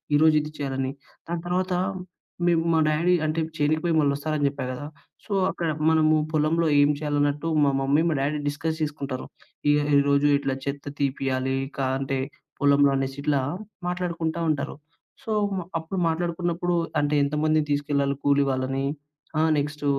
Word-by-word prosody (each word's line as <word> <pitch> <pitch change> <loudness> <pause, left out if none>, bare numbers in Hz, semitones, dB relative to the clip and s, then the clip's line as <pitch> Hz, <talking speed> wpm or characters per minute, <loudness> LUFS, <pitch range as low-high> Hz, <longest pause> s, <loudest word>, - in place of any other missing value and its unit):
ఈరోజు 155 +1 +5
ఇది 150 +1 -7
చేయాలని. 135 -2 -2 0.4
దాని 170 0 -3
తర్వాత 185 +1 0 0.7
మేం 170 -1 +4
మా 160 - +4
డాడీ 160 +4 +2
అంటే 155 +1 0 0.2
చేనుకిపోయి 155 +3 +1
మళ్ళి 145 -2 +3
వస్తారని 150 0 -1
జెప్పా 140 -2 -3
గదా! 130 +3 -5 0.4
సో - - -13 0.2
అక్కడ 170 -2 -2 0.2
మనము 155 -1 +4
పొలంలో 160 +2 +2
ఏం 145 - +5
చేయాలన్నట్టు, 145 +1 0 0.2
మా 140 - +4
మమ్మీ 140 +3 +2
మా - - +1
డ్యాడీ 145 +2 0
డిస్కస్ 150 +3 -2
జేసుకుంటారు. 145 -3 -3 0.4
ఇగ 145 - +5 0.2
ఈరోజు 140 +1 +3
ఇట్లా 140 -1 -2
చెత్త 140 0 -4
తీపియాలి, 135 -1 0 0.2
కా 135 -1 0
అంటే 135 0 -2 0.4
పొలంలో 140 -1 +5
అనేసి 135 0 -2
ఇట్లా 145 -1 +1 0.5
మాట్లాడుకుంటా 170 -2 -2
ఉంటారు. 145 -2 -1 0.5
సో, 225 - -4 0.5
అప్పుడు 165 +4 -4
మాట్లాడుకున్నప్పుడు 175 +1 -1 0.3
అంటే, 145 +1 +1
ఎంతమందిని 155 +1 +1
తీసుకెళ్లాలి 140 -1 0
కూలి 140 0 +4
వాళ్ళని 135 +1 -1 0.5
ఆహ్, 160 0 +3
నెక్స్ట్ 145 +1 -3
145 Hz, 145 wpm, -25 LUFS, 140-160 Hz, 0.7 s, ఈరోజు